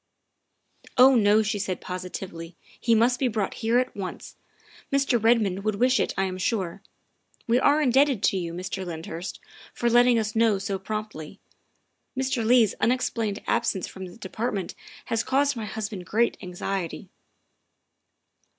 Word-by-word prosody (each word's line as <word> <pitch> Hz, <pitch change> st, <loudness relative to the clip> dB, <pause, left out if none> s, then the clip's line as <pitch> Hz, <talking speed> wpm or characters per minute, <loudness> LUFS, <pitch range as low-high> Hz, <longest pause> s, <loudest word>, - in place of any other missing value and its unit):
" -, -, -50 dB, 0.3 s
Oh, 260 Hz, +2 st, +8 dB
no," 215 Hz, -2 st, +4 dB
she 210 Hz, 0 st, -2 dB
said 190 Hz, -2 st, -3 dB
positively, 180 Hz, -2 st, -7 dB
" -, -, -25 dB
he 230 Hz, -1 st, +3 dB
must 245 Hz, +3 st, +3 dB
be 265 Hz, -, +2 dB
brought 215 Hz, -4 st, -1 dB
here 230 Hz, +1 st, +2 dB
at 255 Hz, 0 st, 0 dB
once. 190 Hz, -2 st, -7 dB, 0.6 s
Mr. 275 Hz, -5 st, +2 dB
Redmond 215 Hz, -5 st, +2 dB
would 215 Hz, -1 st, 0 dB
wish 255 Hz, +5 st, +3 dB
it, -, -, +1 dB
I 195 Hz, -, +2 dB
am 185 Hz, -1 st, -3 dB
sure. 190 Hz, -3 st, -2 dB, 0.6 s
"We 240 Hz, +1 st, +3 dB
are 285 Hz, +3 st, +4 dB
indebted 265 Hz, -3 st, +3 dB
to 195 Hz, -, +3 dB
you, 170 Hz, -2 st, -3 dB
Mr. 185 Hz, +2 st, -5 dB
Lyndhurst, 165 Hz, +1 st, -6 dB, 0.4 s
for 240 Hz, 0 st, +1 dB
letting 240 Hz, 0 st, +5 dB
us 215 Hz, -1 st, -2 dB
know 225 Hz, -2 st, +3 dB
so 195 Hz, 0 st, -3 dB
promptly. 200 Hz, -4 st, -6 dB, 0.8 s
Mr. 260 Hz, -2 st, 0 dB
Leigh's 230 Hz, -2 st, +4 dB
unexplained 225 Hz, -3 st, 0 dB
absence 225 Hz, -6 st, 0 dB
from 190 Hz, -1 st, -8 dB
the 175 Hz, -, -13 dB
Department 210 Hz, -2 st, -3 dB, 0.3 s
has 230 Hz, 0 st, -1 dB
caused 280 Hz, +1 st, +1 dB
my 225 Hz, -2 st, -4 dB
husband 210 Hz, -3 st, -5 dB
great 235 Hz, +3 st, +2 dB
anxiety. 180 Hz, -1 st, -4 dB
215 Hz, 155 wpm, -25 LUFS, 190-240 Hz, 0.8 s, Oh